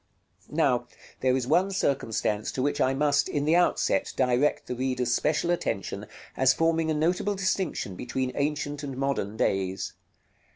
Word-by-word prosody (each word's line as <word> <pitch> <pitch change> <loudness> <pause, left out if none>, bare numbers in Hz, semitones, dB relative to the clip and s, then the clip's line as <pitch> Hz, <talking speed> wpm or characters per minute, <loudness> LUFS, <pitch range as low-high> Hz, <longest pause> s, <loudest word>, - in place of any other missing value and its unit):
Now - - +1 0.3
there 130 0 +2
is 130 - -2
one 175 +8 +3
circumstance 115 - -1
to 130 - -1
which 145 +1 0
I 130 +1 +2
must, 145 0 +2
in 145 -1 -1
the 160 +2 +4
outset, 175 0 +2
direct 130 +3 +2
the - - -4
reader's 125 -1 -1
special 155 +6 +1
attention, 100 - -2 0.3
as 130 0 +4
forming 165 0 +1
a 155 - +1
notable 180 +6 +1
distinction 185 - -1
between 125 +4 -3
ancient 145 0 -2
and 135 -3 -6
modern 130 -6 -1
days. 95 -2 -1
140 Hz, 155 wpm, -27 LUFS, 125-155 Hz, 0.3 s, the